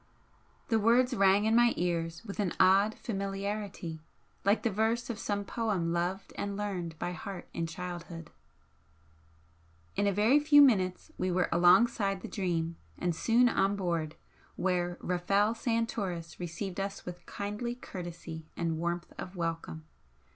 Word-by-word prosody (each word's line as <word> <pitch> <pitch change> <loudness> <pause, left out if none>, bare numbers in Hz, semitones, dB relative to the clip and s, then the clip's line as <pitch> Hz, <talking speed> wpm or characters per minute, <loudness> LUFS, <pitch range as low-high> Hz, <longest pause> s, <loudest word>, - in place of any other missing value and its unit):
The 225 -1 +3
words 245 +4 +4
rang 200 -1 +4
in 220 +1 +3
my 240 0 +5
ears 170 +1 -2
with 200 -1 -7
an 195 -4 0
odd 195 +3 +5
familiarity, 195 -5 -4 0.4
like 200 +2 +3
the 230 - +1
verse 225 +4 0
of 225 - -7
some 205 -2 -2
poem 195 -8 -1
loved 180 +3 -2
and 200 0 -3
learned 180 -6 -3
by 175 - -3
heart 190 0 -7
in 165 -1 -2
childhood. 170 -1 -7 1.6
In 205 - +1
a - - +3
very 215 +9 +4
few 295 0 +6
minutes 195 -10 +4
we 185 - 0
were 180 0 +1
alongside 195 +3 +4
the - - -6
'Dream' 170 -4 -2 0.2
and 175 -2 -1
soon 235 +8 +4
on 195 -3 +2
board, 170 -5 -2 0.4
where 175 -1 0
Rafel 195 +4 +1
Santoris 220 -8 -2
received 180 +2 -4
us 195 0 -4
with 175 0 -8
kindly 210 +4 -4
courtesy 170 -7 -8
and 165 -2 -1
warmth 170 +1 -3
of 185 - -6
welcome. 165 -2 -4
195 Hz, 145 wpm, -31 LUFS, 175-215 Hz, 1.6 s, few